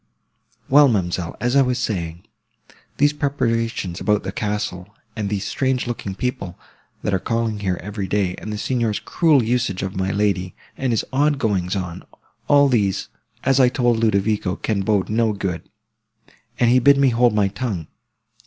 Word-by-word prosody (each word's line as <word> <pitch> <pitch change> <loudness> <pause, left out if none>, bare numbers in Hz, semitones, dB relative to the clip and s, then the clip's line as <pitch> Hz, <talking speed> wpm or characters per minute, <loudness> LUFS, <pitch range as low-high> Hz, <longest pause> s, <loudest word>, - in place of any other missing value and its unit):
"Well, 145 +2 +7
ma'amselle, 90 -6 -1
as 120 +2 0
I 140 - +6
was 125 -2 +1
saying, 85 -8 -3 0.7
these 145 +1 +3
preparations 115 - -1
about 105 -1 +1
the - - -4
castle, 105 -3 -3 0.3
and 105 -2 -2
these 100 -1 -2
strange 130 -2 0
looking 115 -5 -4
people, 100 -6 -4 0.5
that 105 - -1
are 95 - +2
calling 115 0 -1
here 95 -3 -1
every 100 0 -4
day, 95 -2 0
and 105 - -7
the 105 - -3
Signor's 115 -2 -1
cruel 155 -7 +2
usage 115 -5 -1
of 95 0 -4
my 95 0 -1
lady, 95 -2 0 0.2
and 130 -2 -1
his 115 - 0
odd 145 +2 +2
goings 100 -7 0
on—all 100 +9 -1
these, 105 -7 0 0.3
as 135 0 +3
I 125 -2 +6
told 120 -2 +1
Ludovico, 105 -3 +1
can 105 -3 -2
bode 100 -1 +1
no 110 0 +1
good. 95 -4 -4 0.9
And 120 -1 +4
he 130 - +5
bid 140 +2 +5
me 140 -1 +4
hold 120 -2 +3
my 100 -2 +2
tongue. 100 -6 -4
110 Hz, 165 wpm, -21 LUFS, 95-125 Hz, 0.9 s, Well